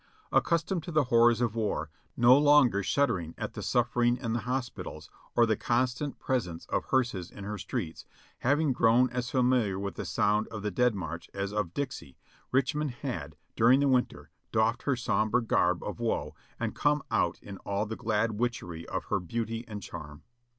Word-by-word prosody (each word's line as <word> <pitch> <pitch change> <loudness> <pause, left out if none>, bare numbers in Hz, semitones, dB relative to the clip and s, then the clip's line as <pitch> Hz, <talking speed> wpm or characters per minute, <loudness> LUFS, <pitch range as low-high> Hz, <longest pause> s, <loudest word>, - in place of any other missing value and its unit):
Ac - - +6
customed 170 +1 0
to 170 - -7
the 155 -2 +3
horrors 115 0 +5
of 120 -3 +1
war, 105 -9 -2 0.3
no 120 +1 +7
longer 145 -7 +5
shuddering 95 - 0
at - - -4
the - - -6
suf 120 0 +1
fering 120 0 +3
in 115 -3 -3
the 120 - 0
hospitals 125 -2 -4 0.2
or 120 - +6
the 110 -1 +2
constant 125 +5 -1
presence 90 -11 -2
of - - -1
hearses 120 -9 0
in 100 - -10
her 105 +1 -5
streets, 80 -2 -5 0.3
having 145 +2 +2
grown 120 +1 +4
as 125 -1 -2
familiar 125 -6 +2
with 100 0 -3
the - - -5
sound 105 +1 +1
of 110 -3 -7
the 105 - -1
Dead 125 +3 +2
March 85 -3 -6
as 100 +1 -3
of 105 -5 -2
Dixie, 130 - -5 0.3
Richmond 140 +3 +1
had, 110 - -4 0.2
during 120 +4 +5
the 140 - +3
winter, 130 -2 0 0.2
doffed 115 +2 +2
her 140 - +2
sombre 120 -1 +1
garb 115 - +1
of - - -5
woe - - -1 0.3
and - - -2
come 150 0 +2
out - - +1
in 100 -1 -9
all 100 +1 -2
the 110 +1 -5
glad 110 +1 0
witchery 90 -9 -3
of - - -3
her - - 0
beauty 115 +5 -4
and 105 -3 -7
charm. 75 -1 -9
120 Hz, 185 wpm, -29 LUFS, 100-130 Hz, 0.3 s, no